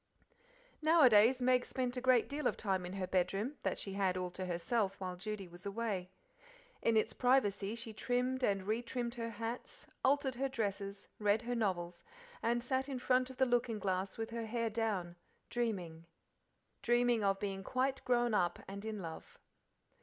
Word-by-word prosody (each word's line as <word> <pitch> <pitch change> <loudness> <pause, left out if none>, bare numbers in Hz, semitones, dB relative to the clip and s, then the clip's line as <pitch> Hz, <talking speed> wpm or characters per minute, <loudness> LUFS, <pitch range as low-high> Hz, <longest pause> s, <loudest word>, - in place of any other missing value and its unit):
Nowadays 255 -6 +6
Meg 250 0 +4
spent 250 -1 -2
a 250 - -2
great 255 -2 +4
deal 290 +1 -1
of - - -1
time 190 -4 0
in 180 - -7
her 195 -1 -2
bedroom, 195 +9 0
that - - -1
she 195 - -4
had 190 -2 +1
all 180 -1 -2
to 185 +1 -5
herself 195 +3 0
while 185 -1 -4
Judy 200 +1 -5
was 175 +1 -13
away. 200 -3 -2 0.7
In 230 -1 +3
its 215 - +2
privacy 210 -5 +2
she 230 -1 -5
trimmed 250 +3 0
and 195 -5 +1
retrimmed 235 +2 -2
her 230 -2 -3
hats, 230 - -6 0.2
altered 275 0 +3
her 270 +2 -1
dresses, 200 -4 -3
read 210 +2 +2
her 245 +1 -2
novels, 180 -6 -1 0.4
and 235 +1 +1
sat 260 +2 0
in 270 - -2
front 255 0 +2
of 260 - -10
the 260 - +4
looking 240 -2 +1
glass 190 -1 -2
with 225 0 -4
her 230 -1 -3
hair 230 0 -1
down, 200 -6 -1 0.3
dreaming 180 -9 -2 1.2
of 195 -1 +2
being 195 -1 -3
quite 260 +5 0
grown 240 -2 +2
up 175 -4 +2
and 200 +1 -7
in 215 -3 -4
love. 160 -1 -8
220 Hz, 170 wpm, -35 LUFS, 195-245 Hz, 1.2 s, Nowadays